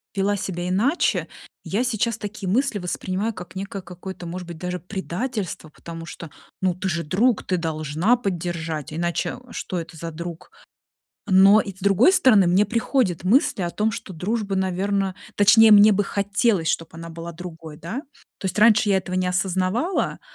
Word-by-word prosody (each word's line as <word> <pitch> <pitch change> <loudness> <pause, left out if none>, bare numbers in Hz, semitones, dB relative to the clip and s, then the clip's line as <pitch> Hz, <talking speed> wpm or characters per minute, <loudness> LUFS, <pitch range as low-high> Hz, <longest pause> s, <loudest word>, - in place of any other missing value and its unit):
вела 200 +1 +1
себя 180 -3 -4
иначе, 225 - +1 0.4
я 215 +5 -1
сейчас 230 -2 0
такие 205 -3 -5
мысли 240 +1 +1
воспринимаю 185 +4 -2
как 175 -2 -10
некое 195 0 -5
какое-то, 180 0 -9
может 175 +1 -6
быть, 170 -2 -8
даже 180 +2 -4
предательство, 190 -1 -4
потому 165 +1 -9
что, 170 -1 -9 0.3
ну, 185 -1 +2
ты 190 +2 -3
же 170 -1 -1
друг, 215 +9 +1
ты 185 - -1
должна 160 - 0
поддержать, 170 - -3
иначе 170 +6 -2
что 185 - -4
это 170 0 -8
за 165 +1 -6
друг. 170 - -8 0.8
Но 195 +3 +7
и, 195 -2 -5
с 190 - -19
другой 200 - +4
стороны, 215 - +5
мне 185 +4 +4
приходят 225 - 0
мысли 255 +1 +3
о 175 - -1
том, 215 +4 0
что 220 -4 -7
дружба, 200 +4 -2
наверно 190 +1 -1 0.2
точнее, 220 +2 +7
мне 210 +1 +8
бы 205 0 +2
хотелось, 200 -3 +1
чтоб 165 -1 -2
она 165 0 -8
была 165 +1 -7
другой, 165 -2 -9
да. 185 - -5 0.4
То - - -14
есть, 185 0 -2
раньше 215 -1 +5
я 195 - +4
этого 185 -1 -4
не 185 0 +1
осознавала, 185 - 0
190 Hz, 170 wpm, -23 LUFS, 175-210 Hz, 0.8 s, мне